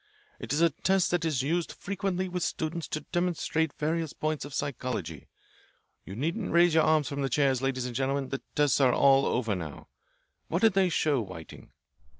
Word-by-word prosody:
It - - -6
is 150 +3 +1
a 170 -1 +5
test 190 -1 +1
that 175 -2 +1
is 145 -6 0
used 165 +4 -1
frequently 190 -1 -3
with 180 0 -4
students 165 0 -2
to 155 - -3
demonstrate 175 -3 0
various 160 0 -1
points 155 -1 -2
of 145 - -9
psychology. 100 - -4 0.8
You 95 - -8
needn't 165 - -2
raise 170 0 +5
your 160 - +5
arms 155 -3 +3
from 140 +1 -3
the 135 - 0
chairs, 135 -3 +2
ladies 130 -2 -1
and 125 -1 -5
gentlemen. 135 +1 -1
The 135 - -4
tests 145 -1 +3
are 130 -2 +5
all 135 0 +5
over 115 -4 0
now. 80 -6 -7 0.6
What 170 +5 -1
did 220 -3 +6
they 190 -1 +3
show, 150 -5 +1
Whiting?" 90 -6 -10
150 Hz, 185 wpm, -28 LUFS, 130-170 Hz, 0.8 s, did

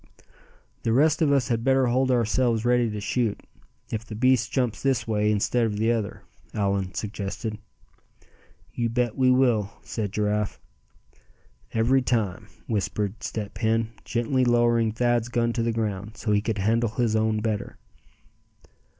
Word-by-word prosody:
"The 115 - 0
rest 150 +6 +3
of 150 -3 +4
us 135 -5 +2
had 115 -1 0
better 135 0 +3
hold 130 +2 +2
ourselves 120 -1 +1
ready 120 -1 +3
to 105 -1 -4
shoot, 115 +1 -1 0.5
if 110 -1 -3
the 110 -1 -8
beast 125 +1 +2
jumps 125 -5 -1
this 130 -4 0
way 105 -1 +1
instead 105 +3 +1
of 105 -2 -3
the 110 +2 +2
other," 110 -4 -3 0.3
Allan 100 -2 -1
suggested. 105 +1 -4 1.1
"You 120 -1 -1
bet 120 -1 0
we 130 -1 +3
will," 120 -6 +3
said 105 -4 -4
Giraffe. 105 0 -1 1.1
"Every 120 +4 +3
time," 110 -7 -1 0.2
whispered 105 0 -2
Step 105 -1 -5
Hen, 115 0 +1
gently 125 +2 0
lowering 120 -2 +3
Thad's 120 0 +1
gun 120 -1 0
to 115 - -1
the 115 0 +1
ground, 105 -1 -3
so 105 - -2
he 105 0 +3
could 110 0 -2
handle 115 +4 +1
his 115 -2 +1
own 110 0 +1
better. 110 -2 -3
115 Hz, 150 wpm, -25 LUFS, 105-120 Hz, 1.1 s, of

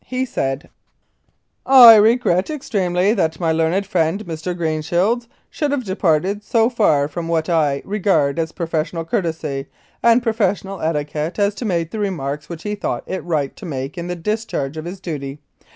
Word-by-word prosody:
He 255 +1 -1
said: 135 - -3 1.0
"I 250 -4 +10
regret 210 -4 +3
extremely 195 - 0
that 160 -8 -1
my 165 -2 +1
learned 165 +5 +1
friend 185 +2 0
Mr. 170 +1 -4
Green 160 -2 -1
shields 195 +10 0 0.2
should 295 - -1
have 280 -2 -1
departed 190 0 0
so 230 +2 +2
far 155 - +2
from 165 +2 -5
what 165 0 0
I 150 -5 +1
regard 175 -8 +1
as 160 0 -1
professional 165 0 -3
courtesy 160 - -2 0.3
and 235 +1 +4
professional 200 -4 -1
etiquette 150 +1 -2
as 205 0 +2
to 235 - -6
make 170 -5 -1
the 220 - -5
remarks 150 -7 -3
which 170 -2 -7
he 210 - -3
thought 205 - -3
it 190 - -4
right 150 -5 -2
to 210 - -10
make 135 -2 -5
in 170 0 -5
the 180 - -3
discharge 175 -6 -3
of 155 0 -6
his 180 +2 -7
duty. 145 -6 -5
175 Hz, 170 wpm, -20 LUFS, 155-210 Hz, 1.0 s, I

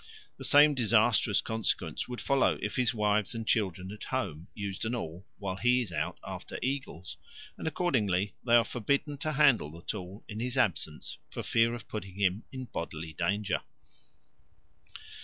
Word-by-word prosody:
The - - -8
same 150 0 +7
disastrous 115 -3 +4
consequence 110 -8 -1
would 125 -1 -5
follow 140 -1 +3
if - - -3
his 125 -3 +3
wives 105 0 +1
and 115 -1 -4
children 95 -3 0
at 105 - -8
home 95 - -3
used 100 -3 -4
an 115 +2 -1
awl 90 -4 -6
while 95 -2 -4
he 125 +3 +3
is 105 - -7
out - - -2
after - - -6
eagles, 130 - -3 0.4
and - - -5
accordingly 105 - +1
they 120 -1 +4
are 120 - +7
forbidden 140 +6 -1
to 155 +2 -1
handle 135 - +4
the 85 +2 -12
tool 95 +3 -5
in 105 0 -6
his 125 +2 -1
absence 85 -9 -1
for - - -5
fear 115 +1 +3
of 120 - -10
putting 100 -4 -6
him 100 +1 +1
in 130 -1 -5
bodily 80 -6 -5
danger. 100 +4 0
110 Hz, 165 wpm, -30 LUFS, 95-125 Hz, 0.4 s, same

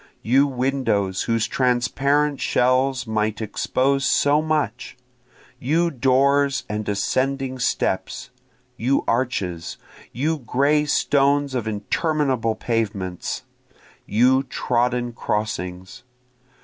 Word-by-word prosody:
You 135 +5 +4
windows 125 -8 -1
whose 115 -1 +2
transparent 135 +3 +1
shells 130 +1 +1
might 110 -1 -1
expose 135 +5 0
so 145 +3 +3
much! 150 -7 -2 0.6
You 165 +6 +1
doors 135 0 +2
and 105 0 -3
ascending 130 +5 -1
steps! 95 0 -2 0.5
you 130 +4 +1
arches! 100 -9 -2 0.3
You 150 +6 -1
gray 140 +5 +1
stones 140 -1 +2
of 120 -4 -2
interminable 125 +2 0
pavements! 105 -6 -3 0.6
you 125 +5 +3
trodden 125 -2 -1
crossings! 95 -5 -4
125 Hz, 90 wpm, -22 LUFS, 110-140 Hz, 0.6 s, You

